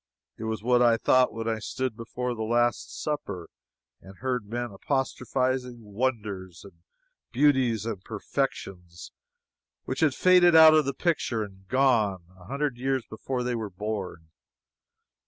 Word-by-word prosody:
It 110 - -6
was 110 -1 -3
what 125 +1 +3
I 120 -2 +5
thought 130 +2 +3
when 115 +1 -5
I 110 -1 -1
stood 130 +2 -3
before 120 +2 -4
"The 110 - -6
Last 120 0 0
Supper" 100 - -4 0.5
and 95 0 -14
heard 125 -5 -2
men 120 +1 -4
apostrophizing 130 +1 -2
wonders, 105 -5 -3
and 85 -4 -16 0.5
beauties 130 -5 +2
and 105 -5 -5
perfections 90 -3 -4 0.7
which 130 - -4
had 150 -4 +2
faded 180 -2 +5
out 160 -1 +9
of 155 -2 +4
the 140 0 -2
picture 130 -10 0
and 95 -2 -12
gone, 110 -8 +2
a 90 -1 -16
hundred 140 +2 -2
years 130 -1 -1
before 125 +3 -4
they 125 0 -1
were 110 -3 -3
born. 95 -4 -5
120 Hz, 145 wpm, -27 LUFS, 105-130 Hz, 0.7 s, out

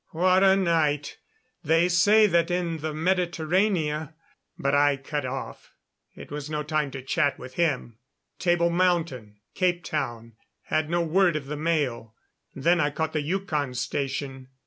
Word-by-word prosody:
What 185 +3 +3
a 190 0 +6
night! 160 -6 0 0.4
They 165 +2 +3
say 205 +5 +5
that 170 -3 +2
in 175 -2 -1
Mediterrania 160 0 0 0.2
" - - -52
But 140 0 -1
I 145 -1 +4
cut 135 0 -4
off; 135 +1 -7 0.4
it - - -11
was 145 0 -5
no 150 -1 -2
time 150 -1 -1
to 135 -1 -8
chat 140 +1 0
with 130 0 -10
him. 140 -9 -1 0.4
Table 175 -1 +2
Mountain, 170 - 0 0.2
Capetown, 150 - -2 0.3
had 155 -1 -1
no 175 +1 +1
word 175 +1 +2
of 150 -3 -3
the 150 +2 -5
mail. 145 -8 -2 0.4
Then 170 +6 +2
I 145 -3 +2
caught 160 +2 -3
the 155 - 0
Yukon 150 -5 -2
Station. 135 +1 -3
155 Hz, 145 wpm, -26 LUFS, 140-175 Hz, 0.4 s, a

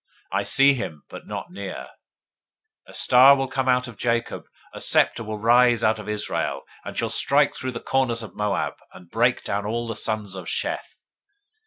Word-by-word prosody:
I - - +1
see 140 +1 +5
him, 80 - -6
but - - -11
not - - -6
near. 95 0 -7 1.0
A - - -14
star 130 +3 +7
will 135 -1 -2
come 130 0 -1
out 125 0 +2
of 115 -4 -11
Jacob. 115 -1 -1 0.3
A - - -9
scepter 115 - +3
will 110 0 -5
rise 120 +1 +4
out 110 0 +2
of 105 - -8
Israel, 105 -1 -2 0.2
and - - -8
shall - - 0
strike - - +2
through 130 0 -5
the 115 - -6
corners 120 -4 0
of 110 - -10
Moab, 105 -2 -1 0.2
and 90 -2 -15
break 120 +2 +1
down 100 +1 -2
all 120 +2 -2
the 115 -1 -5
sons 105 -2 -2
of 95 -1 -8
Sheth. - - -4
115 Hz, 185 wpm, -23 LUFS, 105-125 Hz, 1.0 s, star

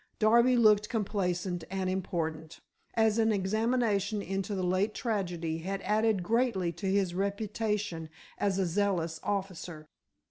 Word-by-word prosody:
Darby 235 +3 +5
looked 210 -2 +5
complacent 185 -5 -1
and 190 -1 -2
important, 165 -4 -3 0.4
as 220 -1 +3
an 225 0 +3
examination 215 0 +1
into 195 +1 -3
the 185 - -2
late 185 +4 +1
tragedy 175 -8 -2
had 195 +4 -3
added 215 -2 +2
greatly 220 -4 +1
to 170 +4 -5
his 190 -2 +1
reputation 200 -3 -2 0.3
as 195 -2 +1
a 190 - +2
zealous 170 -3 0
officer. 185 -5 -4
195 Hz, 130 wpm, -30 LUFS, 180-215 Hz, 0.4 s, Darby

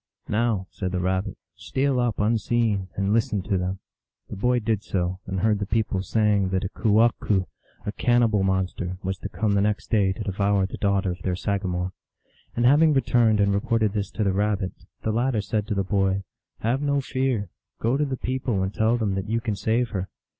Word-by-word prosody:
" - - -66
Now," 110 -3 0
said 95 -2 -3
the 90 - 0
Rabbit, 95 +3 -1
" - - -61
steal 135 -1 0
up 120 -3 0
unseen, 110 -2 +1
and 100 +1 0
listen 110 -3 +1
to 100 0 -1
them! 90 +1 -1 0.3
" - - -51
The - - -4
boy 125 +5 +2
did 110 -3 0
so, 90 -2 -2
and 95 -1 -2
heard 105 -2 +2
the 100 - -3
people 105 -3 0
saying 105 -1 +2
that 95 0 0
a 95 - -2
kewahqu\ 110 -3 +2 0.4
a 105 - -1
cannibal 115 -2 +2
monster, 95 -1 -1
was 95 0 -2
to 100 - -5
come 100 +4 -1
the 100 -1 +3
next 105 +1 -1
day 100 -4 +3
to 100 +3 -4
devour 100 0 +1
the 95 - -6
daughter 100 -2 +1
of 90 0 -7
their 90 0 -1
sagamore. 95 -2 -2 0.6
And 120 - +1
having 150 +4 +6
returned 120 -4 +3
and 100 0 +3
reported 110 +1 +1
this 100 -2 -2
to 110 - -1
the 100 -2 +1
Rabbit, 100 -1 0 0.3
the 110 - 0
latter 120 +1 +1
said 105 0 -2
to 105 - -1
the 100 - +1
boy, 95 0 +1 0.2
" - - -57
Have 120 +5 0
no 140 -1 +1
fear; 130 -7 -1 0.3
go 115 +4 +1
to 145 - +1
the 135 -2 -3
people 125 -6 -1
and 95 +1 -2
tell 110 +2 +2
them 105 -4 0
that 95 +2 -3
you 115 +1 +1
can 115 -3 -2
save 110 +4 0
her." 95 -3 -3
105 Hz, 215 wpm, -25 LUFS, 95-115 Hz, 0.6 s, having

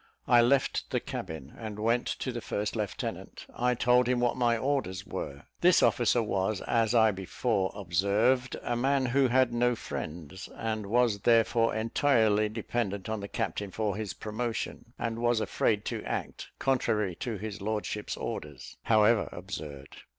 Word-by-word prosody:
I 120 -1 +6
left 135 +3 +2
the 125 - 0
cabin, 90 - -6
and 110 -2 -7
went 115 +3 +1
to 130 - -2
the 120 -1 -5
first 105 +1 -3
lieutenant. 105 -3 -4
I 125 +1 +1
told 125 +1 +3
him 125 -1 +2
what 120 -1 +1
my 120 -2 +2
orders 115 -8 -1
were. 70 +1 -6 0.2
This 180 0 +5
officer 120 0 +3
was, 100 -1 -1
as 115 0 +1
I 110 -2 +6
before 95 +1 -1
observed, 100 +8 +1
a 120 - -1
man 135 +2 +2
who 130 +2 +3
had 125 0 +3
no 120 +1 +2
friends, 85 -2 -6
and 110 -2 -3
was 115 -1 +2
therefore 115 +1 +3
entirely 110 -2 +2
dependent 105 -2 -3
on 110 -1 -2
the 100 - -5
captain 100 -2 -3
for 105 +1 -2
his 105 -2 -4
promotion, 115 +1 -4
and 115 0 -3
was 120 -1 +2
afraid 110 -1 0
to - - -3
act - - -4
contrary 110 -7 +1
to 115 -4 -3
his 105 0 -6
lordship's 105 0 -3
orders, 75 -4 -6
however 110 0 +4
absurd. 75 -7 -8
110 Hz, 160 wpm, -29 LUFS, 100-120 Hz, 0.2 s, I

